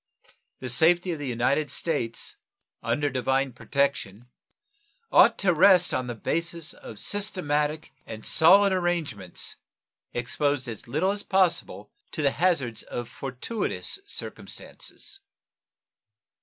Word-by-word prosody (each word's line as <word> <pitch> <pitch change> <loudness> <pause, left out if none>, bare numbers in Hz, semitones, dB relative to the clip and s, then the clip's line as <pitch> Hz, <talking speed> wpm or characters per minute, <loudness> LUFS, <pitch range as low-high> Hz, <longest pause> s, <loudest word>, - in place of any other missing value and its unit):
The 130 - -6
safety 175 +8 +3
of 160 - -4
the 145 - -4
United 130 +5 0
States 130 -9 -2 0.5
under 145 0 0
divine 130 0 0
protection 125 -4 -2 0.8
ought - - +6
to 190 -3 +2
rest 180 +1 +5
on 130 - -1
the 120 - -4
basis 170 +6 -3
of 110 - -11
systematic 155 - -1
and 110 -1 -8
solid 195 +5 +6
arrangements, 165 - -2 0.5
exposed 125 +3 -1
as 115 -1 -7
little 155 +10 +1
as 205 0 -3
possible 185 -4 0 0.2
to 155 - -2
the 140 - +4
hazards 140 -12 0
of 120 -1 -6
fortuitous 135 - -4
circumstances. 395 - -8
145 Hz, 115 wpm, -26 LUFS, 125-175 Hz, 0.8 s, ought